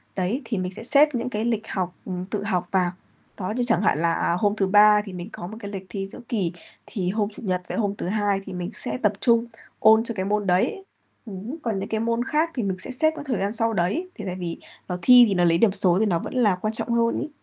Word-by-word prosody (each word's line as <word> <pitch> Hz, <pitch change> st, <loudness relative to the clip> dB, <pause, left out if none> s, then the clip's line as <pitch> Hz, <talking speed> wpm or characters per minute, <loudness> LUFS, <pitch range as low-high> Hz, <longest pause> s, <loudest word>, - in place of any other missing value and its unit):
đấy, 195 Hz, +8 st, -1 dB
thì 225 Hz, -2 st, -2 dB
mình 185 Hz, 0 st, -2 dB
sẽ 195 Hz, -, -4 dB
xếp 295 Hz, +3 st, +4 dB
những 240 Hz, +1 st, -2 dB
cái 215 Hz, -2 st, -2 dB
lịch 225 Hz, -2 st, -1 dB
học 180 Hz, -1 st, -3 dB
ừm, 180 Hz, -1 st, -4 dB
tự 200 Hz, +1 st, -4 dB
học 180 Hz, -4 st, -1 dB
vào. 185 Hz, -2 st, +2 dB, 0.5 s
Đó, 185 Hz, 0 st, -3 dB
như 245 Hz, -, +1 dB
chẳng 225 Hz, -, +3 dB
hạn 185 Hz, -, +2 dB
là 170 Hz, +1 st, +1 dB
hôm 205 Hz, +1 st, +1 dB
thứ 195 Hz, -, +1 dB
Ba 210 Hz, +1 st, +6 dB
thì 195 Hz, -, -8 dB
mình 180 Hz, +2 st, -7 dB
có 175 Hz, -, -7 dB
một 215 Hz, +4 st, -9 dB
cái 200 Hz, -, -6 dB
lịch 190 Hz, -2 st, -6 dB
thi 195 Hz, -2 st, -4 dB
giữa 195 Hz, -, -7 dB
kỳ, 200 Hz, -9 st, 0 dB, 0.3 s
thì 185 Hz, -5 st, -3 dB
hôm 210 Hz, 0 st, -1 dB
Chủ 210 Hz, -, -11 dB
nhật 185 Hz, -3 st, -1 dB
với -, -, -3 dB
hôm 205 Hz, -3 st, 0 dB
thứ -, -, -4 dB
Hai 205 Hz, 0 st, 0 dB
thì -, -, -7 dB
mình 180 Hz, 0 st, -4 dB
sẽ -, -, -3 dB
tập 210 Hz, -, +3 dB
trung 235 Hz, -1 st, +3 dB, 0.3 s
ôn 220 Hz, +1 st, +6 dB
cho 230 Hz, -, -3 dB
cái 190 Hz, -2 st, -2 dB
môn 205 Hz, 0 st, -1 dB
đấy, 190 Hz, -, +1 dB, 0.4 s
ừm, 210 Hz, +5 st, -7 dB
còn 220 Hz, -5 st, -1 dB
những 195 Hz, -, -5 dB
cái 220 Hz, -, -1 dB
môn 230 Hz, +1 st, 0 dB
khác 315 Hz, +4 st, +1 dB
thì 245 Hz, -, -1 dB
mình 190 Hz, -2 st, -2 dB
sẽ -, -, -4 dB
xếp 315 Hz, +5 st, +2 dB
cái 290 Hz, -, -8 dB
thời 250 Hz, -5 st, 0 dB
gian 200 Hz, +1 st, -1 dB
sau 225 Hz, 0 st, 0 dB
đấy, 220 Hz, -, -1 dB
thì 210 Hz, -, -7 dB
tại 180 Hz, -2 st, -3 dB
vì, 175 Hz, -2 st, -4 dB, 0.3 s
ờ, 180 Hz, -, -3 dB
thi 250 Hz, +4 st, +8 dB
thì 200 Hz, -, +1 dB
nó 175 Hz, -, +2 dB
lấy 165 Hz, -1 st, +4 dB
điểm 210 Hz, +3 st, +4 dB
số 180 Hz, -3 st, +2 dB
thì 220 Hz, -, +3 dB
nó 175 Hz, -5 st, +1 dB
vẫn -, -, -7 dB
là 215 Hz, -7 st, +3 dB
quan 215 Hz, +4 st, -3 dB
trọng 225 Hz, -, -3 dB
hơn 235 Hz, 0 st, +2 dB
ấy. 305 Hz, -, -4 dB
205 Hz, 280 wpm, -24 LUFS, 185-230 Hz, 0.5 s, thi